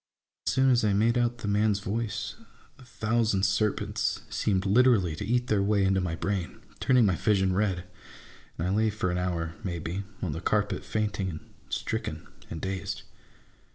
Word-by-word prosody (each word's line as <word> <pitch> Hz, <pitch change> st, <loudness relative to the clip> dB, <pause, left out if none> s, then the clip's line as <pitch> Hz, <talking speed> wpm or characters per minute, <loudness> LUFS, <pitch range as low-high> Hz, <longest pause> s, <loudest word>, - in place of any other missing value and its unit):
As -, -, +2 dB
soon 130 Hz, 0 st, +4 dB
as 120 Hz, -2 st, +3 dB
I 105 Hz, -2 st, +3 dB
made 115 Hz, +4 st, +3 dB
out 120 Hz, 0 st, +1 dB
the 110 Hz, -, -5 dB
man's 105 Hz, 0 st, +2 dB
voice, 105 Hz, +1 st, -3 dB, 0.5 s
a -, -, -13 dB
thousand 115 Hz, -4 st, 0 dB
serpents 100 Hz, +2 st, 0 dB
seemed 95 Hz, -2 st, 0 dB
literally 100 Hz, -5 st, +4 dB
to 80 Hz, -, -5 dB
eat 120 Hz, +4 st, +1 dB
their 105 Hz, -5 st, +2 dB
way 100 Hz, 0 st, +2 dB
into 95 Hz, 0 st, +2 dB
my 85 Hz, -3 st, -2 dB
brain, 95 Hz, -1 st, -3 dB, 0.2 s
turning 125 Hz, -3 st, +4 dB
my 95 Hz, -3 st, +3 dB
vision 95 Hz, +1 st, +2 dB
red; 95 Hz, -2 st, 0 dB, 0.7 s
and 80 Hz, -, -2 dB
I -, -, 0 dB
lay 110 Hz, +2 st, +3 dB
for 100 Hz, -4 st, -1 dB
an 90 Hz, -, -1 dB
hour, 85 Hz, -3 st, -2 dB
may 90 Hz, -4 st, -2 dB
be, 85 Hz, +4 st, -3 dB, 0.2 s
on 90 Hz, -, -1 dB
the 80 Hz, -, -4 dB
carpet, 105 Hz, -1 st, 0 dB
fainting, 105 Hz, -3 st, -1 dB
and 80 Hz, -3 st, -6 dB, 0.3 s
stricken, -, -, -3 dB, 0.2 s
and 80 Hz, -, -5 dB
dazed. 95 Hz, +1 st, -4 dB
100 Hz, 180 wpm, -28 LUFS, 95-110 Hz, 0.7 s, soon